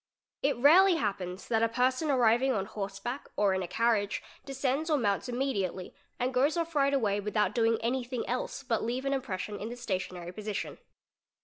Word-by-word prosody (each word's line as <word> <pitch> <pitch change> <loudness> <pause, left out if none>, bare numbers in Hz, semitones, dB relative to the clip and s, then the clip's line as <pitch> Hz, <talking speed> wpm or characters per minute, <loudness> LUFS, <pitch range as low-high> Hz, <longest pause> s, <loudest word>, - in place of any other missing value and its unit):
It 280 -2 +1
rarely 345 +8 +7
happens 195 - -3
that 225 -2 +1
a 230 - +3
person 255 +6 +1
arriving 250 0 +3
on 195 -4 -1
horse 195 -1 -5
back 245 +7 -5
or 200 -2 +3
in 190 - 0
a 180 - -3
carriage 205 +1 +1 0.2
descends 275 +3 -1
or 305 - +3
mounts 205 -1 0
immediately 205 -8 -2 0.3
and 255 +1 0
goes 280 +6 +2
off 335 0 -2
right 280 -2 +3
away 215 -7 +1
without 210 -1 0
doing 230 -1 +2
anything 245 0 -2
else 250 +2 -3
but 235 -4 -1
leave 250 +4 -2
an 275 - +1
impres 260 -8 -2
'sion 205 +2 -5
in 215 - -5
the 240 - -7
stationary 185 -5 -4
position. 210 +2 -5
235 Hz, 190 wpm, -30 LUFS, 205-270 Hz, 0.3 s, rarely